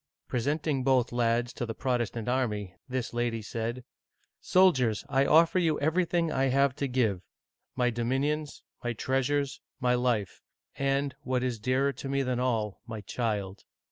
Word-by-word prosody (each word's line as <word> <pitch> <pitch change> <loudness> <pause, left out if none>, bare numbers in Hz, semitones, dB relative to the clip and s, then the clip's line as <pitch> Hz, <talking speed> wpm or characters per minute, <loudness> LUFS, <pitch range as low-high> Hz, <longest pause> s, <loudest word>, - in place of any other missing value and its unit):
Presenting 140 +2 0
both 130 -2 +3
lads 120 0 +1
to - - -4
the 115 -2 -4
Protestant 120 -3 -1
army, 105 -7 -1 0.2
this 125 -2 -3
lady 120 -2 -1
said: 115 +3 -4 0.6
"Soldiers, 135 - +3
I 135 0 +3
offer 165 +3 +5
you 160 -4 +1
everything 170 +2 +1
I 135 - +1
have 135 0 +3
to 140 - -1
give 115 -8 +1 0.3
— - - -57
my 125 -1 +2
dominions, 135 +6 -1 0.2
my 120 0 -1
treasures, 135 +4 0 0.2
my 125 -2 +2
life, 120 -7 0 0.3
and, 140 0 0
what 125 -1 -1
is 125 -3 -2
dearer 130 +5 +1
to 135 - -7
me 140 0 +1
than 125 -1 -1
all, 115 -5 -1
my 110 -2 -5
child. 100 -2 -3
125 Hz, 155 wpm, -29 LUFS, 115-140 Hz, 0.6 s, offer